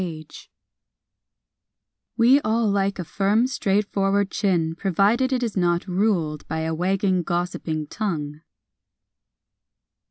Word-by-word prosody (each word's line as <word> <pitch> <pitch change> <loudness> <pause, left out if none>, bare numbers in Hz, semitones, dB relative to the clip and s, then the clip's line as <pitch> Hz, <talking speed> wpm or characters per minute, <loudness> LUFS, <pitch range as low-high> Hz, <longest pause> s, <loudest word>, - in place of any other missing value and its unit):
JAW 160 -3 -6 1.9
We 250 +4 +5
all 225 -1 +1
like 200 -1 0
a 180 - -3
firm, 200 +7 +1
straightforward 200 -4 0
chin 175 -6 0
provided 200 +9 +1
it 255 -1 0
is 230 -3 -3
not 175 -2 +1
ruled 180 -6 -1
by 160 +1 -3
a 160 0 -2
wagging, 185 +2 0
gossiping 175 -3 -3
tongue. 155 -6 -4
195 Hz, 105 wpm, -23 LUFS, 170-210 Hz, 1.9 s, We